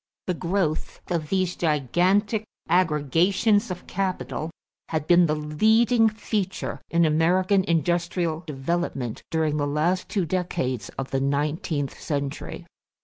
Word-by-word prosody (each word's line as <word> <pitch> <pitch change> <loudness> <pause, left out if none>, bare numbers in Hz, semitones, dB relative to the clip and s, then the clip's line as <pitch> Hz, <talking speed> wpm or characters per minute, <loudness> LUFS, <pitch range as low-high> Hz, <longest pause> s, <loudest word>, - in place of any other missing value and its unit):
The 180 - 0
growth 175 -2 -1
of 160 -3 -1
these 185 -2 0
gigantic 180 - +1 0.2
aggregations 180 - +2
of 180 -1 -6
capital 185 -4 -3 0.4
had 155 -2 -1
been 175 +1 +5
the 150 - +1
leading 220 +10 +3
feature 210 -3 -3
in 170 0 +3
American 180 +5 +3
industrial 170 0 0
development 135 -4 -2
during 155 -2 0
the 145 -1 0
last 160 +6 0
two 195 -5 0
decades 150 - -2
of 135 0 -4
the 135 - +1
nineteenth 145 +1 -1
century. 140 -2 -4
170 Hz, 120 wpm, -25 LUFS, 150-185 Hz, 0.4 s, been